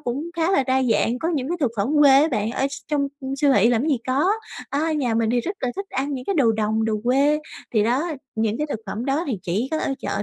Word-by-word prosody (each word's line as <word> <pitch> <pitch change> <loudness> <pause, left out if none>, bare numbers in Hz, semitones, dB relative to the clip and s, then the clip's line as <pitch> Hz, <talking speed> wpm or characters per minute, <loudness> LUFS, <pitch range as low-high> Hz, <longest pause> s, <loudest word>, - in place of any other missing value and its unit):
cũng 280 +8 -4
khá 330 +2 +1
là 380 -8 +3
đa 260 0 +2
dạng, 235 0 +1
có 325 - -2
những 270 -1 -2
cái 350 - -1
thực 265 - +2
phẩm 200 +3 0
quê 285 -2 +7
á 315 - +2
bạn, 215 -2 -1
ở 265 +3 0
s 280 - -6
trong 285 -2 0 0.3
siêu 285 -2 +4
thị 230 -2 +4
làm 235 -1 +2
cái 310 - 0
gì 270 - +2
có. 270 +6 +1 0.4
À, 315 +3 0
nhà 255 -7 0
mình 225 0 +1
thì 245 - +2
rất 380 - -4
là 255 - -1
thích 395 0 -4
ăn 275 +2 -2
những 255 -1 -6
cái 395 - -1
đồ 255 -9 +3
đồng, 220 0 0
đồ 220 -1 0
quê. 280 +4 +3 0.4
Thì 215 - +4
đó, 265 +10 0 0.2
những 220 0 -1
cái 300 - -1
thực 225 - -3
phẩm 220 +5 -4
đó 280 +5 0
thì 245 -8 -2
chỉ 200 +9 -1
có 315 - 0
ở 270 - -1
chợ - - -3
265 Hz, 280 wpm, -23 LUFS, 225-295 Hz, 0.4 s, quê